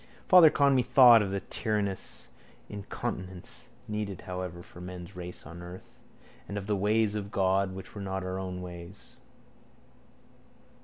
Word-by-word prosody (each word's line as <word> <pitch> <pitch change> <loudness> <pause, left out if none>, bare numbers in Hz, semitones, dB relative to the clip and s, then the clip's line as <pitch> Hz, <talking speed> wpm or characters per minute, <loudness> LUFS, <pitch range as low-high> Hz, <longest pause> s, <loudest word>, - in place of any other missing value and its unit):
Father 180 -4 +9
Conmee 140 -4 +3
thought 120 -2 +8
of 100 - -1
that 100 0 -5
tyrannous 105 -4 -2 0.4
incontinence, 95 -2 -6 0.2
needed 105 -3 -4
however 90 -1 -6
for 90 - -13
man's 90 +1 -8
race 90 0 -8
on 85 +1 -9
earth, 90 +1 -11 0.5
and 100 - -5
of 100 - -4
the 105 0 0
ways 105 +2 +2
of 100 -2 -4
God 95 -1 +1
which 95 - -9
were 100 - -7
not 95 -1 -3
our 95 +1 -3
ways. 90 +1 -9
95 Hz, 140 wpm, -29 LUFS, 90-105 Hz, 0.5 s, Father